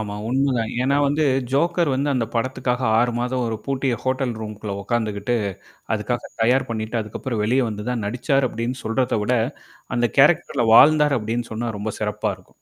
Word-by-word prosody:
ஆமா, 105 -1 -4
உண்மைதான். 130 -3 0
ஏன்னா, 140 +2 +2
வந்து 150 +2 +1 0.3
ஜோக்கர் 170 +2 +2
வந்து 140 +2 0
அந்த 120 -4 0
படத்துக்காக 125 +1 -1 0.2
6 120 +1 +3
மாதம் 125 +1 -1
ஒரு 110 -1 -2
பூட்டிய 135 -2 0
ஹோட்டல் 130 -1 0
ரூம் 110 -1 -5
க்குள்ள 105 -1 -5
உட்கார்ந்துக்கிட்டு, 110 0 -1 0.6
அதுக்காக 120 +3 -3
தயார் 125 +3 +3
பண்ணிட்டு 110 +1 -3
அதுக்கப்புறம் 110 +2 -4
வெளிய 125 +5 +2
வந்து 105 -1 -5
தான் 120 -3 -2
நடிச்சாரு 130 +4 +1
அப்படின்னு 120 +3 -3
சொல்றத 115 0 0
விட, 125 +4 +1 0.6
அந்த 120 0 +2
கேரக்டர் 160 +5 +4
ல - - +3
வாழ்ந்தார் 150 -1 +6
அப்படின்னு 115 +2 -3
சொன்னா 115 +2 -3
ரொம்ப 105 +1 -3
சிறப்பா 105 0 -1
இருக்கும். 95 - -24
120 Hz, 170 wpm, -22 LUFS, 110-135 Hz, 0.6 s, வாழ்ந்தார்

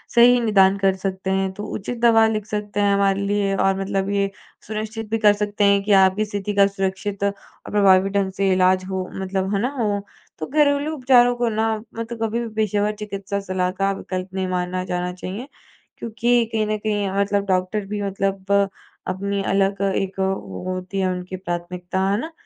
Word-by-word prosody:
सही 245 +1 +7
निदान 200 -4 +4
कर 195 -1 +2
सकते 190 0 -4
हैं, 190 0 0
तो 205 - -7
उचित 225 +4 -4
दवा 225 -2 +6
लिख 215 -2 -2
सकते 210 -1 -4
हैं 200 -1 +3
हमारे 200 0 +2
लिए 200 -1 0
और 195 0 +1
मतलब 195 0 -1
ये 200 -1 +1 0.4
सुनिश्चित 215 +1 -5
भी 225 - +2
कर 210 -1 +6
सकते 205 0 -1
हैं 200 0 +4
कि 210 - -1
आपकी 195 +1 +4
स्थिति 205 0 -4
का 200 0 +6
सुरक्षित 195 0 -3
प्रभावी 200 -1 +2
ढंग 195 -1 0
से 195 -1 +2
इलाज 185 0 +3
हो 190 -1 -3
मतलब। 190 +1 -2
है 200 - 0
ना? 230 -6 -1 0.4
तो 155 - -3
घरेलू 290 0 +2
उपचारों 245 -3 +4
को 240 -1 0
ना 220 0 0 0.2
मैं 230 0 -4
तो 235 +1 -7
कभी 225 +2 -2
भी 235 - -3
पेशेवर 210 -1 +1
चिकित्सा 200 -1 -4
सलाह 185 -2 -1
का 195 +1 0
विकल्प 185 -1 -5
नहीं 190 -1 -2
मानना 180 0 -2
जाना 180 0 -2
चाहिए। 190 +7 -6 0.5
क्योंकि 235 +1 +1
कहीं 220 -1 0
न 215 0 0
कहीं 205 -2 -1
मतलब 200 0 +1
डॉक्टर 185 +2 0
भी 205 +1 -3
मतलब 195 0 -2 0.6
अपनी 200 +2 -2
अलग 195 0 +1
एक 195 0 -2
वो 190 - -2
होती 185 +1 -4
है 190 - +1
उनकी 180 +1 -5
प्राथमिकता 180 0 -4
है 200 - +2
ना? 320 - -6
200 Hz, 185 wpm, -22 LUFS, 190-215 Hz, 0.6 s, सही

